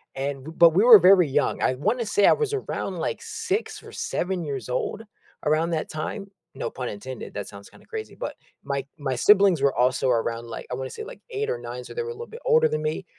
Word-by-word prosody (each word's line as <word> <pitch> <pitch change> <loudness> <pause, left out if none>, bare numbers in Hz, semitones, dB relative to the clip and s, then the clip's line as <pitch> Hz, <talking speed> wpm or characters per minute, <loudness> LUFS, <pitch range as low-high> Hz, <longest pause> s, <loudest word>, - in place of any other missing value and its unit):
and 135 0 -3
b 160 - -7
but 170 -1 +8
we 195 - +5
were 230 -4 +10
very 180 -1 +6
young. 135 - 0
I - - +2
wanna 220 - 0
say 205 -1 +3
I - - +7
was 440 -2 -1
around, 410 - -3
like, - - -2
6 450 -2 -3
or - - -11
7 180 -1 -2
years 135 -6 -5
old 205 - -2 0.4
around 155 +3 +2
that 160 -1 -2
time. 195 +6 -5 0.3
No 135 - -3
pun 125 -1 -5
intended, 125 +4 -8
that 100 -1 -5
sounds 100 0 -11
kinda - - -19
crazy, 440 -1 -6
but - - -5 0.3
my 140 -1 -3
my 135 -2 -2
siblings 195 - +5
were 140 -1 +2
also 125 +2 +2
around, 115 -1 0
like, 115 - -7
I - - -1
wanna 130 +1 -5
say 440 - -7
like - - -10
8 435 +1 -2
or 480 - -1
9, - - -7
so, - - -10
they 475 - -1
were 460 - -6
a 470 - -4
little 465 +1 -8
bit 465 +2 -11
older 475 -1 +5
than 155 0 -2
me, 155 +4 -2
165 Hz, 240 wpm, -25 LUFS, -, 0.4 s, were